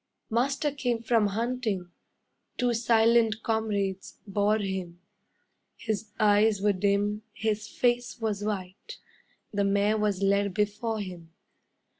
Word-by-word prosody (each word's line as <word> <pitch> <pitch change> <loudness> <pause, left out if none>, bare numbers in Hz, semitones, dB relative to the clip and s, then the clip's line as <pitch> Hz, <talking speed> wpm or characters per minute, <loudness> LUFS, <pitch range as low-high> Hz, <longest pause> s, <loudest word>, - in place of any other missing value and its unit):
Master 275 +5 +1
came 245 -5 -2
from 225 -2 +3
hunting, 220 -4 -2 0.7
Two 245 -1 +1
silent 230 -1 +3
comrades 205 -4 -2
bore 205 +1 +2
him; 190 -4 -4 0.8
His 220 -1 -3
eyes 210 0 +4
were 205 +1 +2
dim, 205 +2 +1
his 215 -1 -2
face 245 +2 0
was 210 -3 -2
white, 200 - -5 0.6
The 200 0 +1
mare 200 +2 +2
was 205 -2 0
led 200 -1 +2
before 210 +1 -1
him. 180 -4 -8
210 Hz, 115 wpm, -28 LUFS, 200-225 Hz, 0.8 s, eyes